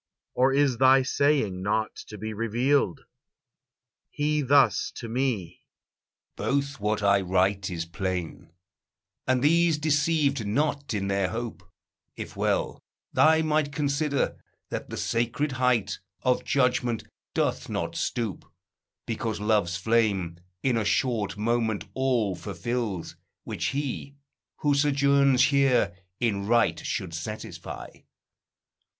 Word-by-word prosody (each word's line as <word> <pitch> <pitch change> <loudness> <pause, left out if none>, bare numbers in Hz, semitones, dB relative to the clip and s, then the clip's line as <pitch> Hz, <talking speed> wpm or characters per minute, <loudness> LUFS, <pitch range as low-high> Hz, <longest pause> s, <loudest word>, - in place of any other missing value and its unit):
Or 130 +1 +3
is 135 -3 +2
thy 130 0 +6
saying 135 -9 +1
not 110 +3 0
to 105 - -9
be 110 +2 -5
revealed?" 115 +1 +1 1.1
He 150 +1 0
thus 140 0 +4
to 115 - -6
me: 115 -8 -2 0.7
"Both 140 0 -1
what 105 0 -1
I 100 0 +4
write 95 +1 +1
is 85 -2 -3
plain, 90 -2 -4 0.8
And 130 0 +2
these 165 +1 +4
deceived 150 -5 +1
not 140 +2 0
in 100 -1 -1
their 100 -1 +1
hope; 115 0 -5 0.5
if - - -7
well - - -1 0.3
Thy 160 0 +5
mind 155 -2 +1
consider, 145 -1 0 0.3
that - - -4
the - - -5
sacred 120 +5 -1
height 125 -4 +1 0.2
Of 125 -1 +1
judgment 125 -4 +1 0.3
doth - - 0
not - - -3
stoop, 115 -7 -3 0.5
because 110 -1 -3
love's 105 -4 +1
flame 95 -5 +1 0.2
In 125 -3 +2
a 110 - +1
short 105 -2 0
moment 110 -1 0
all 120 -7 +1
fulfils, 100 +2 -4 0.3
which - - -4
he, 140 0 -3 0.5
Who 145 -1 +3
sojourns 140 -2 +4
here, 135 -7 +3 0.2
in 100 -4 0
right 120 +1 +2
should 85 - -3
satisfy. 100 +6 -6
120 Hz, 120 wpm, -26 LUFS, 105-140 Hz, 1.1 s, thy